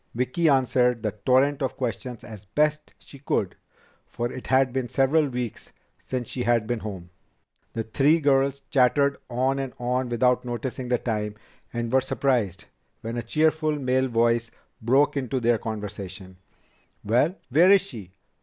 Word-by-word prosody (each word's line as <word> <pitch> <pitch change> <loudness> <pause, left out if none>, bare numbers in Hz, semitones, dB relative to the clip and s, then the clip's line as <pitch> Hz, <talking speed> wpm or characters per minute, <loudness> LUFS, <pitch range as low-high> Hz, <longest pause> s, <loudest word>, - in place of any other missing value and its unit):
Vicki 130 +7 +1
answered 125 -3 +2
the 105 - 0 0.2
torrent 135 +3 +3
of 135 - -2
questions 120 -1 -4
as 105 -3 -11
best 150 +8 0
she 140 - -15
could, 105 -8 -1 0.5
for 120 +1 -3
it 130 - -8
had 130 -1 +3
been 130 -2 -2
several 145 +5 +2
weeks 125 -3 -5 0.3
since 125 -3 -4
she 125 - -5
had 120 -2 +2
been 120 +1 -2
home. 95 -5 -7 0.6
The 115 - -2
three 145 +8 +3
girls 140 -1 +2
chattered 140 +2 +3
on 130 +3 0
and 135 -2 -4
on 125 +1 -1
without 125 +1 +2
noticing 125 +1 -4
the 125 0 +2
time, 105 -3 -3 0.4
and 120 -1 -3
were 130 - +5
surprised 120 -8 -1 0.4
when 115 +1 -5
a 120 - -2
cheerful 155 +3 +1
male 130 -1 +1
voice 115 -1 +1 0.3
broke 135 +7 +3
into 130 -1 -1
their 120 -1 +2
conversation: 100 -4 -7 0.7
"Well, 125 - +2
where 165 +8 +5
is 200 -1 +7
she? 115 - -10
125 Hz, 155 wpm, -25 LUFS, 115-135 Hz, 0.7 s, is